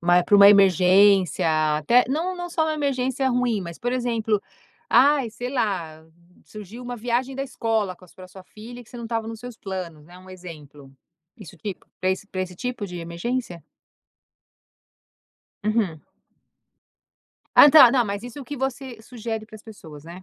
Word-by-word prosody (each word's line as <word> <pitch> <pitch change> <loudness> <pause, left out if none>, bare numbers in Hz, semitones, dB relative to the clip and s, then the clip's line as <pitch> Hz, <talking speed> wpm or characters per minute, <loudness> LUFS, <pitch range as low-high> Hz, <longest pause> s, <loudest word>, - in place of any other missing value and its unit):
Mas 175 +1 +3
para 205 - +4
uma 200 0 +9
emergência, 190 -1 +4 0.3
até 240 +11 +3
não 345 +6 -2
não 350 0 -6
só 325 -2 0
uma 310 -1 -1
emergência 265 -2 -1
ruim, 245 -4 0
mas, 170 -2 -8
por 245 +1 -3
exemplo, 230 -4 -1 0.5
ai, 270 -1 +4
sei 245 +3 -6
lá, 170 - -3 0.4
surgiu 215 +4 -11
uma 245 0 -6
viagem 245 +3 -2
da 270 - -3
escola 225 -7 -2
com 185 - -18
as - - -22
pra 185 -1 -13
sua 185 0 -14
filha 240 +5 -12
que - - -23
você 245 - -11
não 235 - -8
estava 225 -1 -3
nos 225 -1 -7
seus 245 -2 -10
planos, 175 -6 -7
né? 175 +2 -15
Um 185 0 -16
exemplo, 150 -7 -12 0.5
isso 200 -8 -13
tipo, 205 -3 -7
para 185 - 0
esse 195 +2 -5
para 185 -2 -4
esse 180 -1 -6
tipo 245 -1 -5
de 180 -2 -8
emergência. 170 - -5 2.0
Uhum. 210 -8 -1 1.6
Ah, 290 - +9
tá 275 -5 +8
não, 245 -2 +2
mas 200 +1 -4
isso 245 +3 -9
é - - -7
o - - -13
que 290 +3 -7
você 265 -2 -5
sugere 225 -2 -6
para 220 0 -13
as 215 - -17
pessoas, 160 -9 -13
né? 175 +3 -11
215 Hz, 180 wpm, -23 LUFS, 185-245 Hz, 2.0 s, uma